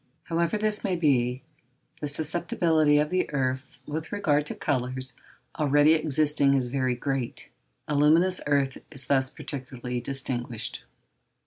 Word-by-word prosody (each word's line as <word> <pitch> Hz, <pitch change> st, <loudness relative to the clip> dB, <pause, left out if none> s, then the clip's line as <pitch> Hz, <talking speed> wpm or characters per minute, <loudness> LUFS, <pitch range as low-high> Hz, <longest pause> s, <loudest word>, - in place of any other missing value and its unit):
However 170 Hz, +3 st, 0 dB
this 210 Hz, 0 st, +2 dB
may 190 Hz, -2 st, 0 dB
be, 130 Hz, -6 st, +1 dB, 0.6 s
the 150 Hz, -, -3 dB
susceptibility 160 Hz, 0 st, +2 dB
of 150 Hz, +1 st, +1 dB
the 185 Hz, 0 st, 0 dB
earths 130 Hz, -1 st, -2 dB
with 155 Hz, +2 st, -5 dB
regard 150 Hz, -8 st, +1 dB
to -, -, -3 dB
colours 130 Hz, -2 st, -2 dB, 0.5 s
already 145 Hz, +1 st, +5 dB
existing 150 Hz, -2 st, +2 dB
is 125 Hz, -2 st, 0 dB
very 130 Hz, -1 st, 0 dB
great; 135 Hz, -1 st, -4 dB, 0.4 s
aluminous 155 Hz, +5 st, +3 dB
earth 140 Hz, -2 st, +1 dB
is 135 Hz, -3 st, 0 dB
thus 130 Hz, -1 st, +2 dB
particularly 125 Hz, -3 st, -6 dB
distinguished. 125 Hz, -, -3 dB
145 Hz, 125 wpm, -26 LUFS, 130-155 Hz, 0.6 s, already